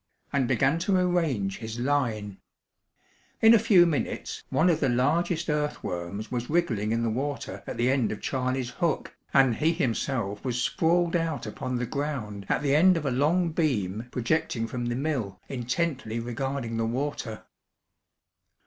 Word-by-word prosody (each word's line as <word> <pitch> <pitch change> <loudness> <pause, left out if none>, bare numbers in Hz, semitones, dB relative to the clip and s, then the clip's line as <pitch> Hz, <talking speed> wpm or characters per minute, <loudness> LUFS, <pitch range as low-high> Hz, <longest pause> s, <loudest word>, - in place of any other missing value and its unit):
and 135 -3 +2
began 135 +5 +2
to 185 +2 +2
arrange 160 - 0
his 110 0 -6
line. 120 -7 -1 1.0
In 225 +1 +7
a 230 - +7
few 200 -6 +6
minutes 160 -5 -2
one 165 - +3
of 170 -3 +3
the 135 - +2
largest 160 +7 +1
earthworms 105 - -3
was 125 -1 -3
wriggling 120 -11 +1
in 115 +1 +1
the 115 - +1
water 130 -5 -3
at - - -5
the 120 +2 +2
end 130 -5 +1
of 105 - -4
Charley's 130 -1 -2
hook, 170 -3 -1 0.2
and 135 -4 +4
he 160 +2 +3
himself 115 - -1
was 125 -2 -1
sprawled 170 +6 +2
out 165 -3 -1
upon 130 - -4
the 125 0 -1
ground 120 -8 -4
at - - +1
the 140 -1 +3
end 180 +3 +6
of 155 - -3
a 135 - +1
long 160 +7 +2
beam 115 - -1
projecting 125 -2 0
from 120 +1 -4
the 120 - -1
mill 125 -9 -2
intently 125 -2 -2
regarding 120 0 -3
the 115 - 0
water. 125 -3 -3
130 Hz, 160 wpm, -27 LUFS, 115-155 Hz, 1.0 s, In